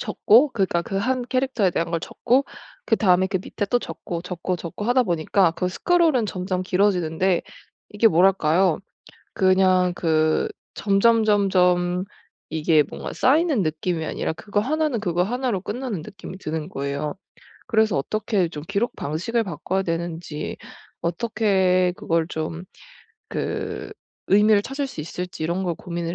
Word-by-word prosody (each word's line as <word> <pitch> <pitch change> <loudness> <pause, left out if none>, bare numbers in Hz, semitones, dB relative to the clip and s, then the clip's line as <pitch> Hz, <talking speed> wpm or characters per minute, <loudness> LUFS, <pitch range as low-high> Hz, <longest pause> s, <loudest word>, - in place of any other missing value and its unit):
적고 255 +6 +4
그니까 190 -6 +1
그 195 - -4
1 250 +4 0
캐릭터에 255 -7 +1
대한 165 0 -2
걸 170 - 0
적고 260 +10 +1 0.4
그다음에 190 -5 +3
그 190 0 -1
밑에 205 - -4
또 245 - +3
적고, 170 -6 -6
적고, 180 0 -3
적고 170 +5 -6
하다 245 +2 +3
보니까 175 -1 +2
그 180 +2 -2
스크롤은 315 - +2
점점 185 -1 -3
길어지는데 180 -2 +1 0.5
이게 210 +2 +3
뭐랄까요? 180 -2 +3 0.6
그냥 185 -1 +3
그 155 -1 +1 0.3
점점 220 +3 +3
점점 180 -3 +2 0.4
이게 155 -1 +3
뭔가 - - -7
쌓이는 295 - +3
느낌이 160 +1 -2
아니라 155 - -2
그거 205 +4 -2
1 310 +6 0
는 235 -6 -2
그거 175 -3 +1
1 245 +5 -1
로 195 - -1
끝나는 225 -4 -4
느낌이 195 +1 -10
드는 155 -3 -4
거예요. 140 +3 -3 0.5
그래서 220 - +2
어떻게 195 +4 0
좀 150 -2 -8
기록 230 +5 -1
방식을 185 +11 -1
바꿔야 190 +2 -2
되는지 165 -2 -4 0.5
어떻게 185 -1 +1
그걸 165 -1 0
좀 160 +1 -4 0.6
그 - - -4 0.4
의미를 210 +1 +5
찾을 275 +3 -3
수 255 - -7
있을지 175 +2 -6
이런 175 +3 -1
걸 175 -2 -1
고민을 170 -1 -5
185 Hz, 295 characters per minute, -23 LUFS, 170-215 Hz, 0.6 s, 의미를